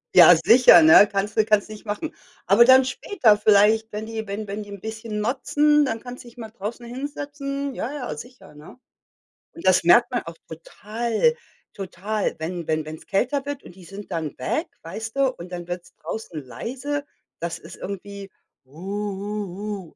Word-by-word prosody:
Ja, - - +10
sicher, 240 -8 +8
ne, 160 +6 +8
kannst 200 +1 -2
du 215 - +5
kannst 210 -2 +2
nicht 215 0 -10
machen, 265 +10 -4 0.3
aber 200 +6 +6
dann 260 +1 +7
später 255 - +2
vielleicht, 215 +2 +4
wenn 210 +1 -5
die 225 -1 -5
wenn 205 +2 -5
wenn 205 +2 -5
die 205 - -14
'n 200 0 -8
bisschen 220 +1 -6
motzen, 295 +6 +2
dann 230 -5 -2
kannst 250 +1 -10
dich 240 0 -16
mal 220 -2 -8
draußen 225 +3 -7
hinsetzen. 280 +1 -5
Ja, 250 - -4
ja, 265 -4 -5
sicher, 245 - -13
ne? 150 +9 -14 0.8
Und 335 - -11
das 185 -2 +4
merkt 240 +8 +5
man 245 - -1
auch 165 0 -9
total 220 - -1 0.4
total, 200 +2 -3
wenn 170 +1 -5
wenn 155 0 0
wenn's 155 +1 -9
kälter 265 +7 0
wird, 285 -1 -5
und 175 - -14
die 185 -2 -15
sind 195 +1 -10
dann 160 -3 -4
weg, 320 - -2
weißt 220 +7 -7
du, 275 -1 +2
und 180 -2 -11
dann 175 -1 -6
wird's 175 +1 -7
draußen 165 -9 -7
leise. 270 - -5 0.3
Das 170 0 -4
ist - - -13
irgendwie: 200 0 -7 0.4
„Uhuhu, 200 +3 -5
215 Hz, 175 wpm, -23 LUFS, 190-245 Hz, 0.8 s, Ja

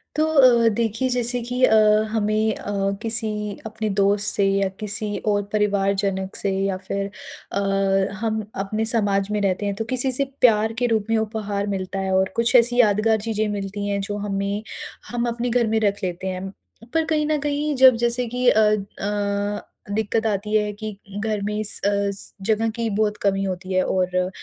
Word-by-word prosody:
तो 310 - +2
अ, 255 -7 +5
देखिए, 225 +3 -1
जैसे 245 0 0
कि 250 +2 -3
अ, 220 - +4 0.3
हमें 215 0 +1
अ, - - -6 0.3
किसी 225 0 +1 0.4
अपने 220 0 -3
दोस्त 200 +1 +3
से 200 - +2
या 195 0 +2
किसी 210 0 -3
और 205 -1 +2
परिवारजनक 200 -2 0
से 200 - -1
या 195 -1 -1
फिर 195 +1 -4 0.4
अ, 200 - -1 0.6
हम 220 -1 -1 0.2
अपने 215 +3 -2
समाज 205 -3 +1
में 210 - 0
रहते 195 0 0
हैं, 200 -1 -1
तो 220 +2 -3
किसी 255 +1 +1
से 275 +2 0 0.2
प्यार 220 -2 +4
के 245 - +3
रूप 220 -3 +1
में 225 - +3
उपहार 210 -2 -2
मिलता 195 -1 -3
है 190 0 -2
और 190 0 +2
कुछ 235 +2 +1
ऐसी 245 0 +5
यादगार 220 0 +3
चीज़ें 215 -1 -1
मिलती 200 0 -4
हैं, 200 0 -1
जो 205 +1 -4
हमें 200 +1 -2 0.5
हम 240 0 -1
अपने 235 +1 -2
घर 240 -1 +2
में 220 0 +1
रख 205 -1 0
लेते 180 +1 -3
हैं। 185 +1 -4 0.4
पर 325 -1 +2
कहीं 310 -2 +1
न 305 0 +1
कहीं, 295 +1 -1
जब 260 -1 +7
जैसे 240 +1 0
कि 250 0 0
अ 220 - +4
अ, 205 0 -1 0.2
दिक़्कत 220 +1 0
आती 210 0 -2
है 210 -1 +2
कि 215 -1 -7 0.2
घर 215 -1 -2
में 210 +1 -2
इस 215 -1 +2
अस 200 -1 -1
जगह 225 +1 +2
की 230 -1 -1
बहुत 210 0 0
कमी 195 -1 +1
होती 185 0 -4
है 185 - +3
और 185 0 0
210 Hz, 185 wpm, -22 LUFS, 200-230 Hz, 0.6 s, जब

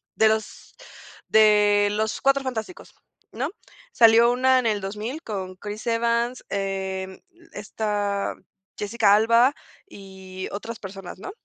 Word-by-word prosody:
de 220 - +4
los 220 0 -4 0.5
de 210 -1 +4
los 215 +1 -2
Cuatro 275 0 +2
Fantásticos, 255 +7 -6 0.4
¿no? - - -3 0.4
Salió 230 +1 +6
una 260 +1 +3
en 245 - -3
el 210 -2 0
2000 215 +10 -5
con 190 -4 -5
Chris 210 +3 -8
Evans, 235 +1 0
em, 190 -1 -4 0.3
esta, 205 -1 -3 0.4
Jessica 205 -1 +3
Alba 230 +5 +4 0.3
y 190 - -9
otras 225 +3 -7
personas, 195 -2 -9
¿no? 210 - -7
210 Hz, 120 wpm, -24 LUFS, 200-235 Hz, 0.5 s, Salió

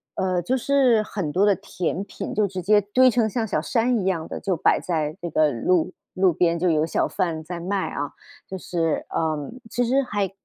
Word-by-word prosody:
呃， 185 -2 0
就 215 +10 0
是 255 -4 +3
很 190 -7 -4
多 190 +6 +3
的 205 -1 +4
甜 180 +2 -3
品 200 - -6
就 210 -1 +2
直 185 -1 -5
接 205 +4 +4
堆 250 +6 +4
成 235 -3 +1
像 225 0 -2
小 155 - 0
山 235 +7 +1
一 190 - -3
样 175 -4 -1
的， - - -6
就 190 -2 -1
摆 - - +3
在 155 -3 -2
这 170 - -3
个 155 -1 +3
路 165 +9 +1 0.2
路 185 -1 +3
边 170 0 +1
就 180 +1 +2
有 155 -1 +2
小 165 - 0
贩 170 -5 -2
在 175 +2 -6
卖 190 +3 -2
啊。 145 0 -4 0.4
就 190 - -5
是， 165 -3 -1
呃， 155 -3 -2 0.2
其 245 - 0
实 265 +4 +2
还 205 -6 -2
185 Hz, 230 characters per minute, -23 LUFS, 165-210 Hz, 0.4 s, 的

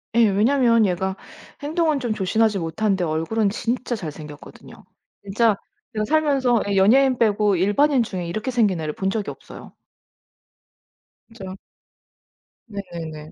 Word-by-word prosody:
예 230 -2 +5
왜냐하면 230 +2 +3
얘가 190 +1 -1 0.5
행동은 310 -1 +1
좀 240 -4 -2
조신하지 215 +1 +1
못한데 190 +3 -1
얼굴은 165 +7 0
진짜 240 +3 -2
잘 165 -7 -6
생겼거든요. 150 -1 -12 0.4
진짜 210 +2 +2 0.4
제가 215 -1 -1
살면서 275 -5 +2
예 200 - 0
연예인 250 +7 +4
빼고 210 -2 +2
일반인 240 - +3
중에 185 -5 -5
이렇게 215 +9 -3
생긴 210 -8 +2
애를 155 -1 -3
본 190 +4 -2
적이 210 0 -3
없어요. - - -13 1.6
그죠. 195 -5 -9 1.1
네네네. 170 -6 -8
210 Hz, 295 characters per minute, -22 LUFS, 185-235 Hz, 1.6 s, 예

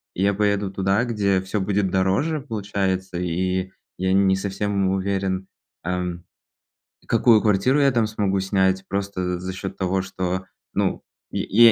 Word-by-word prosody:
Я 100 +2 +2
поеду 100 -1 +1
туда, 95 +3 +1
где 100 -5 +1
всё 95 +2 -2
будет 100 0 +1
дороже, 95 - +1
получается, 100 -6 -2
и 90 +2 -1 0.3
я 95 0 0
не 95 0 +4
совсем 100 0 -1
уверен, 95 0 -1 0.4
ам, 90 -1 -2 0.8
какую 115 -3 +5
квартиру 110 +7 +3
я 140 -1 +5
там 120 -3 +2
смогу 100 -3 0
снять. 95 0 +1
Просто 100 -1 -2
за 90 -1 -1
за 95 +1 -5
счёт 95 +1 -5
того, 95 0 0
что, 95 0 -3 0.3
ну, - - 0 0.3
я 115 +2 +5
95 Hz, 145 wpm, -23 LUFS, 95-100 Hz, 0.8 s, какую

